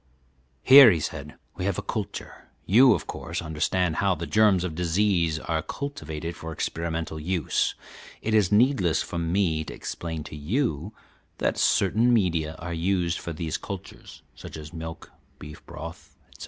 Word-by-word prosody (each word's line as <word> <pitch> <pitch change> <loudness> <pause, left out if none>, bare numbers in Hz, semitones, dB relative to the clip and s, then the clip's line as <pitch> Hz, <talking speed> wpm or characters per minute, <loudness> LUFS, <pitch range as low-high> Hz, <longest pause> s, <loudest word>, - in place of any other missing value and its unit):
"Here," 135 -2 +10
he 85 -6 +2
said, 75 0 -6 0.2
"we 90 - -3
have 100 -2 0
a - - -3
culture. - - -6 0.2
You, 125 +5 +6
of - - -5
course, 85 +1 -5
understand 80 +2 -1
how 100 -2 +2
the 85 +1 -5
germs 105 -3 +3
of 90 -3 -3
disease 85 -1 +1
are 80 +1 -2
cultivated 85 - -6
for 80 0 -7
experimental 80 0 -3
use. 85 -1 0 0.4
It 110 - -2
is 105 -5 +3
needless 105 - +3
for 85 - -5
me 85 -1 0
to - - -8
explain 80 -2 -5
to 75 - -9
you 85 - -1 0.5
that - - 0
certain 120 +4 +3
media 85 -8 +1
are 85 +1 -6
used 90 0 0
for 85 - -6
these 80 0 -3
cultures, 100 -2 -9
such - - -10
as 75 +1 -10
milk, 80 -1 -8 0.3
beef 75 0 -11
broth, 85 +2 -9
etc. - - -20
85 Hz, 160 wpm, -26 LUFS, 80-100 Hz, 0.5 s, Here